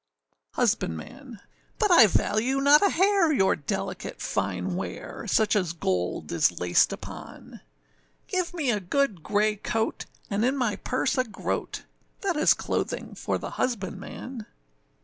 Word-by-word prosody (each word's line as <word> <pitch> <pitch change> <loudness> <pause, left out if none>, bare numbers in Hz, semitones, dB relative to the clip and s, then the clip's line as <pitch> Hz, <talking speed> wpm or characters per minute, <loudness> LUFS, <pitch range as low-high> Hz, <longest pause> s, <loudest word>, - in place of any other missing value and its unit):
HUSBANDMAN. 225 - -2 0.4
But 420 -4 +2
I 250 -11 +9
value 235 +7 +1
not 285 +2 +6
a 400 - +4
hair 380 -2 +3
your 190 -10 +3
delicate 145 - -4
fine 95 -3 -2
wear, - - -6
Such 215 -1 +2
as 180 -5 0
gold 90 - -2
is 85 +1 +2
laced 90 0 +3
upon; - - -9 0.7
Give 365 -2 -1
me 310 -8 0
a 210 - 0
good 205 - 0
grey 210 +3 +1
coat, 225 +2 -2 0.2
and 205 +2 -1
in 260 +3 +1
my 240 -6 0
purse 255 +1 -1
a - - +4
groat, 225 - -4 0.4
That 385 -4 0
is 300 - +4
clothing - - -3
for - - -2
the - - -6
husbandman. 220 +1 -4
220 Hz, 140 wpm, -26 LUFS, 180-280 Hz, 0.7 s, I